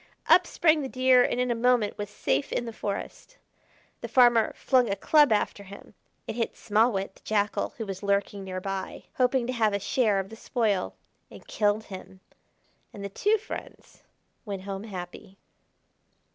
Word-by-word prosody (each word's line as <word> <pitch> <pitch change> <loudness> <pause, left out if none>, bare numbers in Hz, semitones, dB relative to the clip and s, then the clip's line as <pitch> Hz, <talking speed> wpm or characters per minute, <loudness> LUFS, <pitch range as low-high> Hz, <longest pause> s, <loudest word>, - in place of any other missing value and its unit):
Up 360 -1 +5
sprang 315 -2 +3
the 270 - -3
Deer 255 -1 +4
and 245 - -1
in 250 -1 +1
a - - +3
moment 235 -2 +2
was 205 -1 -5
safe 140 -8 -1
in 240 - -1
the 230 - -6
forest. 215 - -6 0.6
The - - -6
farmer 240 -3 +4
flung 255 -4 +2
a 200 - 0
club 295 +6 +4
after 210 -1 0
him; 200 0 -13 0.3
it - - -5
hit 230 - -2
Small 220 +4 +2
Wit, 195 -2 -3
the - - -24
Jackal, 210 -1 -1
who 225 - -4
was 195 -2 -6
lurking 200 0 -1
near 185 -1 -5
by 195 0 -5
hoping 250 -1 +2
to 255 - -3
have 220 -4 +1
a 200 - 0
share 215 0 +1
of 195 0 -4
the 225 - -10
spoil, 220 -5 -1 0.3
and - - -14
killed 210 0 0
him; 190 -1 -11 0.7
and 200 - -9
the - - -4
two 415 - +1
friends 425 - -10 0.4
went 200 -4 -6
home 195 +1 -6
happy. 190 0 -9
215 Hz, 180 wpm, -27 LUFS, 195-250 Hz, 0.7 s, Up